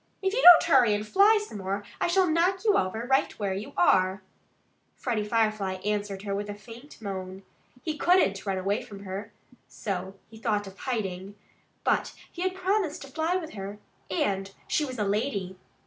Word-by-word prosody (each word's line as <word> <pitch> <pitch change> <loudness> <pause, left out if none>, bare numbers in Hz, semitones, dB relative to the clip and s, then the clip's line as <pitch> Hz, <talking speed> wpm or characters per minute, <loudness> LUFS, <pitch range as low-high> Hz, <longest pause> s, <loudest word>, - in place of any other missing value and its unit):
"If 385 +1 +1
you - - +1
don't 355 -5 +10
hurry 250 -9 +4
and 210 +1 -3
fly 405 - +5
some 210 - -8
more 195 +2 -3 0.2
I - - +1
shall 370 +1 +3
knock 355 +5 +1
you 420 - +4
over 220 +5 0
right 270 +2 +2
where 200 -3 -1
you 200 +3 -5
are!" 185 +1 +3 0.7
Freddie 230 -4 -2
Firefly 215 -3 0
answered 205 -2 -2
her 200 -1 -3
with 205 +1 -3
a 205 - -4
faint 230 +7 -13
moan. 190 -1 -6 0.4
He 305 -2 -3
couldn't 345 - +3
run 195 -2 -1
away 195 +3 0
from 205 -5 -11
her. 200 +3 -6 0.4
So 190 -1 -5
he 220 -1 -14
thought 210 -2 0
of 195 -1 -10
hiding. 200 -6 -4 0.5
But - - 0 0.2
he 350 - -8
had 370 0 0
promised 370 -5 -1
to 275 - -11
fly 320 +5 -1
with 330 -4 -3
her. 200 0 -6 0.3
And 195 +1 -1 0.2
she 305 - +1
was 255 -2 -6
a 210 - 0
lady. 200 -3 -2
210 Hz, 185 wpm, -27 LUFS, 195-300 Hz, 0.7 s, don't